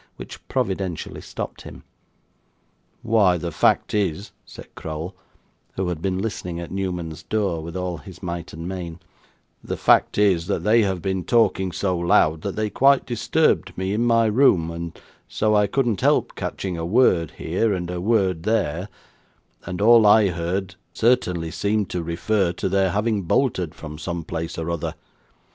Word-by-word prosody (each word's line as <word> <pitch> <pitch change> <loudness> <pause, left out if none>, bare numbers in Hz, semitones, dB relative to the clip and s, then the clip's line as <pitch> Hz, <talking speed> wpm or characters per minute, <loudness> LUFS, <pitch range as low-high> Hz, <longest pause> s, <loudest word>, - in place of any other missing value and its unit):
which - - -9
providentially 95 -3 -3
stopped - - -6
him. - - -11 1.2
'Why 105 -6 +3
the 85 0 -4
fact 80 - +2
is,' 100 -2 -1 0.2
said - - -12
Crowl, 80 +4 -6 0.6
who 95 -1 -2
had 85 -3 -4
been 95 0 -1
listening 95 -4 -4
at 85 - -7
Newman's 90 -4 -4
door 100 -7 -1
with 85 +3 -6
all 90 -1 -3
his 95 -2 -13
might 85 -1 -5
and 80 +2 -7
main; 90 -3 -6 0.6
'the - - -4
fact - - +3
is, 95 -5 +3
that - - -1
they 115 +2 +4
have 95 -4 -1
been 95 -2 -1
talking 95 -5 +2
so 95 +2 -1
loud, 80 -2 +3
that 100 - -4
they 110 0 0
quite 135 +5 +3
disturbed 120 -3 +1
me 95 +1 -1
in 110 +3 +1
my 115 -1 +4
room, 105 -8 +3
and 85 0 -7 0.3
so 110 0 0
I 105 -1 +4
couldn't 120 -2 0
help - - +2
catching 90 -3 -4
a - - -3
word 90 - +3
here, 95 +7 0
and 90 -2 -2
a 90 -1 -4
word 95 -5 +1
there; 95 -3 -1 0.8
and 90 - -4
all 115 -1 +7
I 105 -1 +6
heard, 90 +3 -3 0.2
certainly 90 -9 +1
seemed 105 +1 -1
to 90 - -2
refer 85 +3 0
to - - -3
their 95 0 +2
having 105 +2 0
bolted 95 - 0
from 75 -1 -9
some 85 +1 -4
place 80 0 -5
or 85 +1 -3
other. 85 -2 -3
95 Hz, 165 wpm, -23 LUFS, 85-105 Hz, 1.2 s, all